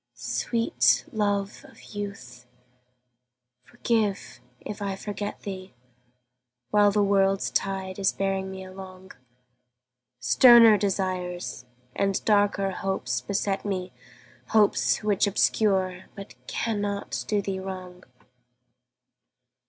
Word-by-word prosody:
Sweet 125 - +1
love 205 +1 -1
of 270 - -17
youth, 130 -13 -7 1.2
forgive 215 - -2 0.2
if 210 - -8
I 200 -1 -2
forget 205 +1 -6
thee 190 -4 -8 1.0
While 205 -1 +5
the 205 0 +2
world's 195 -1 +2
tide 190 -1 -2
is 195 - +3
bearing 195 -1 -2
me 190 0 -7
along; 185 0 -11 1.1
Sterner 225 - +7
desires 185 -7 -3 0.3
and 195 -1 0
darker 205 -2 +2
hopes 150 -11 -2
beset 195 +6 -2
me, 185 -3 -4 0.5
Hopes 130 - +2
which 205 -1 +2
obscure 190 -2 +1
but 200 -1 -10
cannot 205 -3 -3
do 210 - +1
thee 195 -1 -3
wrong. 185 -1 -8
195 Hz, 100 wpm, -26 LUFS, 185-205 Hz, 1.2 s, Sterner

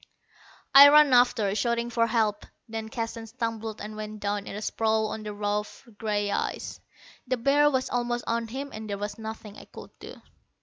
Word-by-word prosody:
I 280 +1 +11
ran 295 -2 +6
after, 245 -5 +3
shouting 235 +2 -1
for 230 0 +2
help. 220 -3 0 0.2
Then 220 -1 -6
Keston 225 0 -5
stumbled 225 -2 -4
and 215 +1 -7
went 215 0 -7
down 205 0 -3
in - - -6
a 210 - -5
sprawl 220 0 0
on 220 - -5
the 210 0 -6
rough 205 +4 -4
gray 205 -2 -1
ice. - - -3 0.5
The 255 0 0
bear 285 +4 +4
was 260 -2 -1
almost 240 0 -1
on 230 0 -1
him 270 +5 -6
and 215 0 -7
there 200 - -3
was 205 +1 -5
nothing 220 -1 -8
I - - -13
could - - -12
do. - - -11
225 Hz, 185 wpm, -27 LUFS, 210-240 Hz, 0.5 s, I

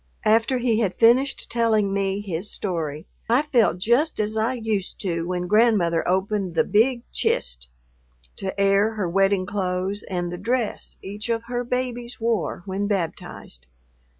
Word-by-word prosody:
After 225 +4 +3
he 235 -3 +1
had 200 -5 0
finished 250 +4 +3
telling 220 -4 +2
me 195 0 0
his 190 0 -4
story, 160 -5 -3 0.2
I 245 +5 +4
felt 235 - +2
just 240 - +1
as 215 +1 -1
I 225 +4 +1
used 220 -5 -3
to 170 -3 -2
when 180 0 -2
Grandmother 205 -5 +3
opened 190 0 0
the - - +4
"big 235 +3 +2
chist" - - -1 0.7
to 195 +1 -5
air 200 +2 +3
her 205 -4 -1
wedding 195 +1 +2
clothes 190 0 -2
and 175 -2 -2
the 175 - -6
dress 235 +2 -2
each 210 +4 -5
of 230 -1 0
her 245 +1 -3
babies 245 -1 -3
wore 225 -7 -1
when 200 +1 -2
baptized. 165 - -4
205 Hz, 150 wpm, -24 LUFS, 185-230 Hz, 0.7 s, I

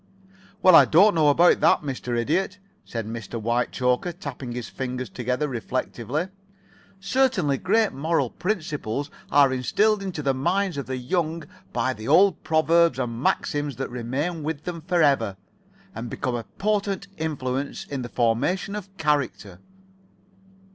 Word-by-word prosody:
"Well, 185 - +7
I - - +9
don't 200 +7 +5
know 160 -3 +3
about 170 +5 +5
that, - - +4
Mr. 125 -4 -3
Idiot," 180 +10 0 0.3
said 115 -2 -5
Mr. 115 +1 -6
Whitechoker, 125 +6 0
tapping 140 -7 -7
his 120 -1 -5
fingers 130 -4 -5
together 125 +5 -1
reflectively. 130 - -3 0.7
"Certain 195 - +1
great 215 +3 +2
moral 145 -3 0
principles 155 - -3 0.2
are 140 -2 +5
instilled 205 - +2
into 185 -6 -4
the 135 -1 +2
minds 175 +7 0
of 140 - -4
the 130 0 -3
young 160 +5 -1 0.3
by 130 +2 0
the 110 0 -9
old 180 +4 +4
proverbs 160 -2 +3
and 120 -2 -3
maxims 145 0 0
that 135 - -5
remain 135 +8 -3
with 150 0 -4
them 170 -1 -5
forever, 145 - +2 0.6
and 115 +1 -6
become 125 - -3
a 120 -2 -3
potent 200 - -1
influence 140 -3 -3
in 140 -2 -4
the 120 - -6
formation 125 - 0
of 200 -2 -6
character." 140 - -1
145 Hz, 140 wpm, -24 LUFS, 125-175 Hz, 0.7 s, I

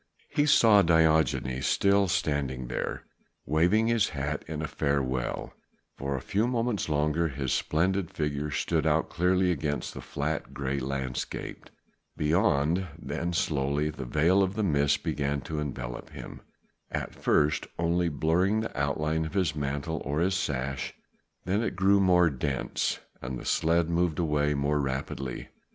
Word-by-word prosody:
He 145 0 +1
saw 110 -7 +6
Diogenes 80 -6 +2
still 100 0 +3
standing 70 -8 -1
there, - - -3 0.4
waving 90 +8 +3
his 115 -3 +2
hat 75 0 -3
in 80 -1 -3
farewell: 65 -5 -1 0.4
for 70 +1 -3
a 65 - -3
few 105 - 0
moments 120 -6 -1
longer 75 +2 +1
his 65 -3 -2
splendid 90 +3 0
figure 75 -1 -2
stood 70 - 0
out - - +2
clearly 90 +1 +2
against 75 -3 -2
the - - -7
flat 75 +2 -3
grey 70 0 -2
landscape 65 -1 -4 0.5
beyond, 85 +1 +2
then 80 +3 -3
slowly 75 -4 0
the 75 - -7
veil 80 +9 +3
of 95 +2 0
mist 70 -8 +2
began 70 -3 -1
to 75 +1 -4
envelop 65 -4 -5
him, - - -9 0.5
at - - -4
first 75 0 +1
only 85 +1 +1
blurring 85 +8 +1
the 110 - -5
outline 75 +3 0
of 80 +4 -6
his 90 -5 +1
mantle 70 +2 -2
or 70 +3 -1
his 95 +3 +2
sash, 70 -7 -2 0.5
then 100 +4 +1
it 115 - -2
grew 95 +2 +4
more 90 -3 +4
dense 65 0 -1 0.2
and 65 0 -4
the - - -9
sledge 85 +1 +2
moved 85 -1 0
away 75 -3 +1
more 70 +1 +1
rapidly. 65 -1 -3
75 Hz, 145 wpm, -28 LUFS, 70-90 Hz, 0.5 s, saw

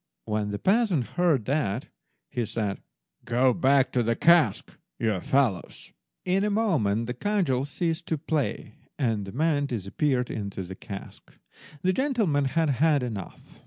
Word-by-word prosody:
When 105 -1 -1
the 105 - -3
peasant 195 - +2
heard 165 -10 +1
that, 130 -5 -1 0.4
he 120 - -1
said— 110 -2 -3 0.4
"Go 125 +2 +3
back 135 -4 +3
to 125 - +1
the 115 0 +1
cask, 170 +2 +3 0.2
you 110 -5 0
fellows." 120 -4 -1 0.3
In 190 +2 +2
a 210 - +1
moment 155 - +1
the 125 - -3
cudgels 145 -5 0
ceased 165 +3 -2
to 160 - 0
play, 145 -7 -2 0.2
and 115 -7 0
the 95 - -7
men 145 +2 +1
disappeared 125 - -1
into 100 -3 -4
the 90 +1 -7
cask. 100 +1 -10 0.5
The 185 +1 +3
gentleman 215 - +1
had 155 +3 +1
had 155 -4 +4
enough. 105 -7 -7
135 Hz, 150 wpm, -26 LUFS, 110-165 Hz, 0.5 s, had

